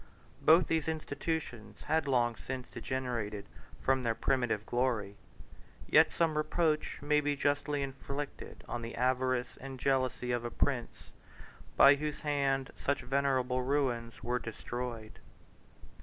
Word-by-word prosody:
Both 165 +2 +6
these 160 -2 0
institutions 145 -8 -4
had 155 -1 +1
long 120 -3 +2
since 130 +1 -6
degenerated 120 -5 -3 0.3
from 135 0 +2
their 115 -2 0
primitive 120 -3 0
glory; 120 -5 0 0.7
yet - - +6
some 165 -2 +1
reproach 155 0 0
may 150 +1 +3
be 145 0 0
justly 145 0 0
inflicted 140 +1 -6
on 120 - -3
the 115 0 -6
avarice 130 0 0
and 135 -1 -7
jealousy 130 -2 0
of 120 -1 0
a 120 - -2
prince, 125 -1 -2 0.7
by 140 - +9
whose 150 +1 -3
hand 140 -3 0
such 140 - -1
venerable 130 -1 +1
ruins 125 -4 -1
were 125 +1 0
destroyed. 115 -1 -6
130 Hz, 125 wpm, -32 LUFS, 120-145 Hz, 0.7 s, by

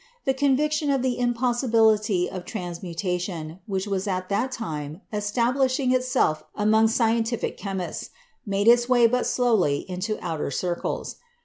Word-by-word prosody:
The 270 - +2
conviction 285 +2 +1
of 270 -2 +1
the 255 -2 0
impossibility 230 -5 +2
of 185 -2 -6
transmutation, 175 -2 -4
which 195 -2 -2
was 195 -1 -2
at 185 -1 -2
that 225 +6 0
time 155 - -5
establishing 250 +5 +1
itself 250 -11 +1
among 220 +1 +4
scientific 230 0 0
chem 195 -2 -4
ists, 175 - -5 0.3
made 200 +1 -1
its 240 +1 +5
way 245 -2 +5
but 250 +2 +2
slowly 220 - +2
into 185 +4 -3
outer 160 -5 -3
circles. 175 +5 -3
215 Hz, 135 wpm, -25 LUFS, 185-245 Hz, 0.3 s, its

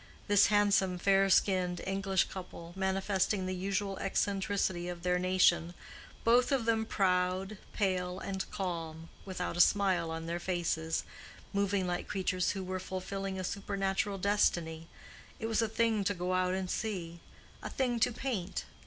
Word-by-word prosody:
This 205 -1 +6
handsome, 200 -3 +3
fair 195 +1 +3
skinned 185 -2 +2
English 195 -1 +1
couple, 175 -2 -9
manifesting 190 0 0
the 185 - -2
usual 195 +1 -2
eccentricity 195 -2 0
of 175 -1 -6
their 180 0 +2
nation, 180 -2 +3 0.5
both 245 +3 +4
of 265 -5 +1
them 225 -1 +1
proud, 185 +1 0
pale, 185 -2 -1
and 190 0 -4
calm, 165 -3 -4 0.2
without 180 -3 -3
a - - +6
smile 185 -5 +3
on 165 0 -4
their 170 +1 -2
faces, 170 -3 -1 0.5
moving 200 -1 +1
like 175 0 -2
creatures 185 -2 0
who 195 -2 -4
were 185 0 -3
fulfilling 190 +1 -4
a - - -3
supernatural 195 +1 -1
destiny—it 175 -1 -2
was 225 0 +1
a 225 - +1
thing 220 -1 +1
to 205 - +1
go 180 +1 -2
out 185 0 +1
and 190 -1 -3
see, 175 -6 -3 0.4
a - - -5
thing 245 -3 0
to 235 - +3
paint. 210 -7 -3
190 Hz, 150 wpm, -32 LUFS, 180-200 Hz, 0.5 s, This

